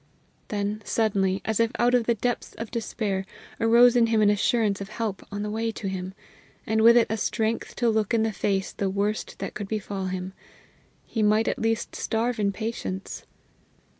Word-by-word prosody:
Then, 205 +1 -2
suddenly, 195 -4 +1
as 220 -1 0
if 230 0 +3
out 245 +1 +3
of 245 -2 +3
the 235 - +3
depths 245 +2 -2
of 225 -1 -6
despair, 215 -4 -2 0.4
arose 235 +2 +6
in 235 -1 +5
him 225 -1 +2
an 205 - +5
assurance 210 -1 +1
of 195 - -6
help 215 -3 -3
on 205 0 -3
the 210 - -3
way 225 +1 -1
to 205 - -5
him, 190 0 -4 0.5
and 220 +1 +1
with 235 +2 +8
it 235 - +5
a 220 - 0
strength 225 +1 -1
to 240 - +1
look 220 -2 +1
in 225 -1 +3
the 220 -1 0
face 195 -1 -1
the 195 - -1
worst 200 +2 -2
that - - -5
could 205 -2 -5
befall 200 -2 -3
him; 185 0 -4 0.7
he 225 - -3
might 215 +1 +3
at - - -1
least 225 0 -1
starve 230 +1 -1
in 200 -1 +2
patience. 200 -2 -5
215 Hz, 195 wpm, -26 LUFS, 200-230 Hz, 0.7 s, with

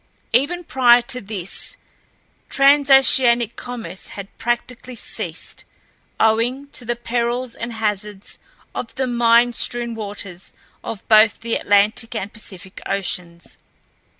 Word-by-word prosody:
Even 290 +9 +2
prior 245 -5 +5
to 250 0 -1
this, 195 -3 -5 0.7
transoceanic 270 -4 +5
commerce 245 -5 -7
had 200 -1 -9
practically 240 +1 -3
ceased, - - -5 0.6
owing 240 +6 +1
to 260 - -9
the 240 +1 -2
perils 240 +1 -2
and 235 +1 -6
hazards 210 -2 -4 0.3
of 230 - -6
the 265 - 0
mine 240 0 +4
strewn 240 0 0
waters 200 -4 -7 0.3
of 220 - -7
both 215 0 +5
the 230 0 -3
Atlantic 210 +3 +2
and 205 -1 -4
Pacific 195 -3 -9
Oceans. 175 -3 -4
235 Hz, 115 wpm, -20 LUFS, 210-245 Hz, 0.7 s, prior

